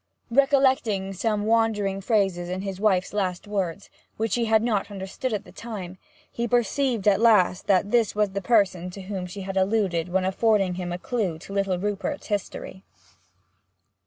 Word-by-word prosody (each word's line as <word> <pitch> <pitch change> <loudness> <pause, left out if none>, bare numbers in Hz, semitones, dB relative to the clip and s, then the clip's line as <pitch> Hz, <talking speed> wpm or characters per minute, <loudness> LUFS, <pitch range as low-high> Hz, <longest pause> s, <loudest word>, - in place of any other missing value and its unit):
Recollecting 260 -7 +2
some 210 +2 -1
wandering 215 -3 +1
phrases 195 -5 +1
in 185 +1 -3
his 195 -2 -5
wife's 195 -3 +1
last 190 -1 -2
words, 195 -3 -3 0.3
which 220 -2 -1
he 240 -1 +1
had 220 0 +3
not 210 -4 0
understood 200 +6 -4
at 210 -2 -2
the - - -15
time, 190 -6 -7 0.3
he 235 0 -2
perceived 245 -1 +1
at 200 -1 +5
last 200 -5 +4
that 200 0 +2
this 235 -4 +2
was 210 -2 +1
the 200 +1 -3
person 195 -6 +2
to 195 +2 -9
whom 185 -2 -4
she 195 +3 -8
had 195 0 -4
alluded 190 -4 +1
when 185 +1 +1
affording 195 -1 +2
him 175 -1 -4
a 175 - -2
clue 195 -5 -2
to 185 +4 -10
little 195 -2 0
Rupert's 205 +9 -3
history. 200 -2 -4
200 Hz, 170 wpm, -25 LUFS, 185-225 Hz, 0.3 s, at